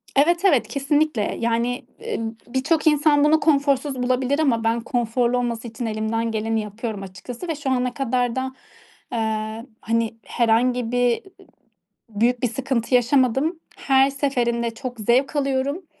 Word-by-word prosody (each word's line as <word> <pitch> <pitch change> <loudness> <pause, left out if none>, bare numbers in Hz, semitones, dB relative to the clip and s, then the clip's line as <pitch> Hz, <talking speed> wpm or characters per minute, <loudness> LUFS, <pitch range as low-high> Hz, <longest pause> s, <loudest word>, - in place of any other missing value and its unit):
Evet, 340 +6 +3
evet, 285 -10 +4
kesinlikle. 290 -4 0
Yani, 235 +2 -1 0.3
ııı, 225 0 -4
birçok 290 +6 0
insan 295 -1 +4
bunu 310 +1 +4
konforsuz 280 -2 +2
bulabilir 255 +3 +1
ama 235 -7 +2
ben 230 +1 +1
konforlu 240 +1 0
olması 235 -1 -2
için 230 +1 -5
elimden 225 +1 -1
geleni 220 0 -1
yapıyorum 210 -1 -5
açıkçası 230 - -8
ve 325 - -1
şu 285 -2 -4
ana 250 -1 0
kadar 250 -2 0
da, 260 - 0 0.7
ııı, 220 +1 -2
hani, 230 0 0
herhangi 240 +1 +1
bir 245 +2 +1 0.9
büyük 235 +4 +1
bir - - +4
sıkıntı 255 -1 -1
yaşamadım. 265 +6 +2 0.2
Her 270 0 +3
seferinde 240 -4 0
çok 245 0 -7
zevk 250 +7 +2
alıyorum. 280 +5 -1
245 Hz, 140 wpm, -22 LUFS, 230-275 Hz, 0.9 s, evet